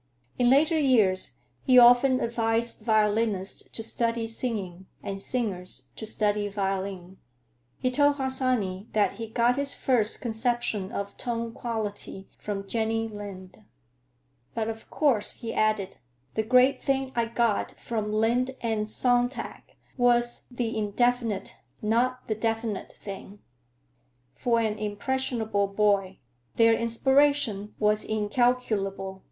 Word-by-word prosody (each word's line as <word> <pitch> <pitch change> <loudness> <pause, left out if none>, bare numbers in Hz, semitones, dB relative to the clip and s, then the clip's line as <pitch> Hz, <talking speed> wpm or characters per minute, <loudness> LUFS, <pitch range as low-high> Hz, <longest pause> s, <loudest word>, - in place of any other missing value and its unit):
In 245 -1 +4
later 310 +5 +4
years 220 -10 +3 0.3
he 255 -2 +4
often 245 +2 +7
advised 230 0 0
violinists 215 -3 0
to 225 - -4
study 230 0 -1
singing, 200 -6 -4 0.2
and 195 0 -4
singers 185 - -3
to 220 - -6
study 210 -1 0
violin. 195 -2 -3 0.6
He 255 - 0
told 285 +2 +3
Harsanyi 255 -8 0
that 210 -1 +1
he 225 -1 -5
got 235 +3 +2
his 280 0 +1
first 230 -5 +1
conception 230 -4 -1
of 200 -4 -5
tone 230 -1 -3
quality 210 -5 -5
from 195 -1 -5
Jenny 225 +1 -1
Lind. 190 - -9 0.9
"But, 225 -1 -1
of 225 0 -8
course," 255 -9 +2
he 230 -1 -6
added, 215 -3 0 0.4
"the 220 - +1
great 250 +4 +4
thing 270 -1 0
I 235 -1 +2
got 230 -2 0
from 215 -3 -3
Lind 240 +4 +1
and 220 -2 -1
Sontag 245 +2 -1 0.2
was 240 -1 +2
the 245 -3 -3
indefinite, 230 0 0 0.2
not 245 +4 0
the 220 - 0
definite, 225 -1 -2
thing. 200 0 -9 1.0
For 235 -2 +1
an 215 -1 -1
impressionable 220 -1 -1
boy, 195 -2 +1 0.4
their 230 0 +5
inspiration 230 -2 +2
was 210 0 +2
incalculable. 210 -3 0
225 Hz, 120 wpm, -27 LUFS, 205-245 Hz, 1.0 s, often